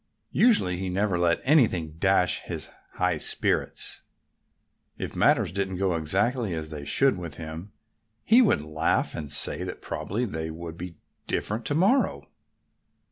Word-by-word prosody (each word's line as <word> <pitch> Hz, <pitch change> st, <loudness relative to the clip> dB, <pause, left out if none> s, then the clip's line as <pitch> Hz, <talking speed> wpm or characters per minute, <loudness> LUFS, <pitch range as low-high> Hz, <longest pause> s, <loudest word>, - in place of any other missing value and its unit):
Usually 205 Hz, -, +4 dB
he 95 Hz, 0 st, -3 dB
never 95 Hz, -1 st, 0 dB
let 85 Hz, -1 st, +1 dB
anything 95 Hz, -, +2 dB
dash 95 Hz, -2 st, +3 dB
his -, -, -6 dB, 0.2 s
high -, -, 0 dB
spirits. -, -, 0 dB, 1.0 s
If -, -, -6 dB
matters -, -, +3 dB
didn't 95 Hz, -1 st, -2 dB
go 95 Hz, -2 st, 0 dB
exactly 100 Hz, -, -1 dB
as 80 Hz, -1 st, -6 dB
they 75 Hz, -2 st, -7 dB
should 100 Hz, -, +3 dB
with 85 Hz, -4 st, -7 dB
him 80 Hz, +5 st, -8 dB, 0.5 s
he 235 Hz, +4 st, +5 dB
would 215 Hz, -, +3 dB
laugh 75 Hz, 0 st, 0 dB
and 75 Hz, -2 st, -6 dB
say 75 Hz, -, +2 dB
that -, -, -6 dB
probably 115 Hz, +6 st, -3 dB
they 80 Hz, -6 st, -4 dB
would 80 Hz, 0 st, -8 dB
be 85 Hz, -1 st, -8 dB, 0.3 s
different 110 Hz, +2 st, -2 dB
to 145 Hz, -, 0 dB
morrow. 200 Hz, -, +2 dB
90 Hz, 145 wpm, -26 LUFS, 80-110 Hz, 1.0 s, he